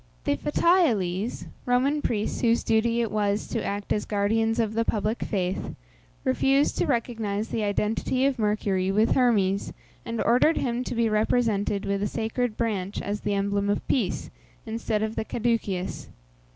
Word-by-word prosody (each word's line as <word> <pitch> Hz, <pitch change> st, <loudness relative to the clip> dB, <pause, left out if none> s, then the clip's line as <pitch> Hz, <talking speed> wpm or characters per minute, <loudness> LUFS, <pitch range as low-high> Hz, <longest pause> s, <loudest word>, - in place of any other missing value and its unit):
The 285 Hz, -, +1 dB
Fetiales 245 Hz, -, +1 dB, 0.2 s
(Roman 265 Hz, +4 st, +2 dB
priests 215 Hz, -5 st, -1 dB
whose 235 Hz, -1 st, +3 dB
duty 230 Hz, +1 st, +2 dB
it 230 Hz, -, -1 dB
was 205 Hz, -1 st, 0 dB
to 230 Hz, -, -2 dB
act 200 Hz, 0 st, -2 dB
as 210 Hz, -, -1 dB
guardians 225 Hz, +2 st, +1 dB
of 220 Hz, -2 st, 0 dB
the 230 Hz, +1 st, +1 dB
public 220 Hz, 0 st, -1 dB
faith) 185 Hz, -3 st, -2 dB, 0.5 s
refused 270 Hz, +2 st, +2 dB
to -, -, +2 dB
recognize 225 Hz, -5 st, -1 dB
the 225 Hz, -, -1 dB
identity 215 Hz, +5 st, 0 dB
of 270 Hz, -3 st, +1 dB
Mercury 200 Hz, -3 st, +1 dB
with 215 Hz, +3 st, +3 dB
Hermes, 200 Hz, -6 st, +2 dB, 0.3 s
and 230 Hz, -1 st, -4 dB
ordered 250 Hz, +7 st, +4 dB
him 245 Hz, -1 st, -1 dB
to -, -, -4 dB
be 230 Hz, 0 st, +2 dB
represented 215 Hz, -2 st, +1 dB
with 200 Hz, 0 st, -1 dB
a 205 Hz, -, +1 dB
sacred 225 Hz, +1 st, -2 dB
branch 205 Hz, -4 st, -2 dB
as 205 Hz, +1 st, -3 dB
the 205 Hz, -1 st, -1 dB
emblem 200 Hz, 0 st, 0 dB
of 205 Hz, -, -1 dB
peace, 230 Hz, -9 st, -1 dB, 0.3 s
instead 220 Hz, -1 st, -2 dB
of 220 Hz, +1 st, -2 dB
the -, -, -1 dB
Caduceus. 220 Hz, -6 st, -2 dB
220 Hz, 160 wpm, -26 LUFS, 205-240 Hz, 0.5 s, ordered